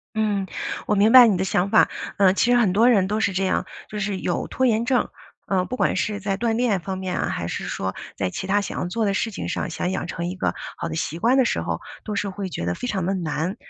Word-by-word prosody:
嗯， 205 -3 0 0.4
我 210 - +2
明 205 +2 +4
白 250 -1 +10
你 195 -5 +2
的 190 - 0
想 190 +1 0
法。 - - +5 0.3
呃， 190 -1 +5
其 240 - +2
实 245 - +5
很 215 -7 +3
多 225 +5 +5
人 195 -5 +3
都 210 +1 0
是 200 - +1
这 190 +1 0
样， 185 - +1 0.2
就 210 - -6
是 195 -1 -2
有 175 - -2
拖 260 - 0
延 225 0 +2
症。 255 -1 +1 0.4
呃， 185 -2 +1
不 255 - -5
管 - - +1
是 210 -1 -1
在 195 -1 -1
锻 225 +1 0
炼 225 -6 +1
方 190 +2 -4
面 185 -1 -3
啊， - - -1
还 - - -3
是 - - -4
说 95 0 -3 0.2
在 95 -2 -1
其 190 - -5
它 205 +2 +2
想 200 - -5
要 - - -1
做 220 +5 -1
的 200 - +1
事 225 +2 0
情 - - -5
上， - - -2
想 180 +2 -2
养 190 - -2
成 170 0 -4
一 180 - -3
个 185 - -1 0.2
好 - - -4
的 160 - -5
习 165 0 -3
惯 240 +7 +3
的 260 - +5
时 - - 0
候， - - -3 0.2
都 210 - -4
是 200 0 -1
会 195 0 -5
觉 85 - -5
得 85 - 0
非 - - -5
常 190 -6 -1
地 195 - 0
难。 175 +2 -2
195 Hz, 300 characters per minute, -23 LUFS, 185-220 Hz, 0.4 s, 白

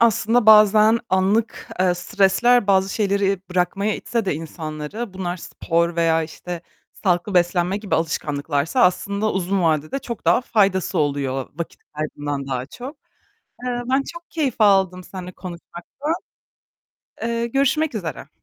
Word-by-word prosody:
aslında 230 0 +3
bazen 215 +1 +7
anlık, 200 +4 +1
eee, 185 -1 +3
stresler 205 +6 +3
bazı 190 -1 +2
şeyleri 200 -2 +1
bırakmaya 190 +4 0
itse 230 -3 -2
de 185 - 0
insanları, 160 +6 -6
bunlar 180 -1 -3
spor 170 -1 -1
veya, 165 -1 +3
işte, 170 +2 -7 0.3
sağlıklı 185 +1 -1
beslenme 175 +1 +2
gibi 205 -1 -2
alışkanlıklarsa 155 - -1
aslında 200 +4 +1
uzun 190 0 0
vadede 155 - +1
çok 235 -7 -7
daha 175 +8 +4
faydası 200 -7 +1
oluyor 140 -3 -1
vakit 170 +2 -6
kaybından 145 -2 -4
daha 130 -1 -3
çok. 255 - -9 0.7
Eee, 245 -1 -2
ben 265 +1 +2
çok 340 0 -11
keyif 290 -7 -1
aldım 190 -3 +4
seninle 180 0 -8
konuşmaktan. 175 -1 -9 1.4
Eee, 235 0 -1
görüşmek 280 +4 +1
üzere. 180 -7 -5
190 Hz, 130 wpm, -22 LUFS, 170-220 Hz, 1.4 s, bazen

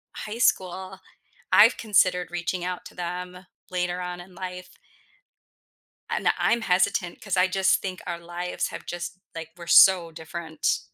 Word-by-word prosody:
high 215 +1 -6
school, 190 -4 0 0.5
I've - - +7
considered 185 -5 +2
reaching 175 +1 -3
out 180 0 -4
to - - -12
them 180 +1 -6 0.3
later 180 0 -1
on 180 0 -5
in 180 +1 -15
life. 180 0 -7 1.4
And - - 0
I'm 235 -1 +2
hesitant 180 -1 +1
'cause 195 -3 -2
I 185 - +5
just 190 0 +2
think 185 -1 -5
our 170 -1 -3
lives 175 +1 -4
have - - -9
just 175 +1 -5 0.2
like, 165 -1 -7
we're 170 - -10
so 180 -2 +7
different 160 0 -3
180 Hz, 150 wpm, -25 LUFS, 175-185 Hz, 1.4 s, I've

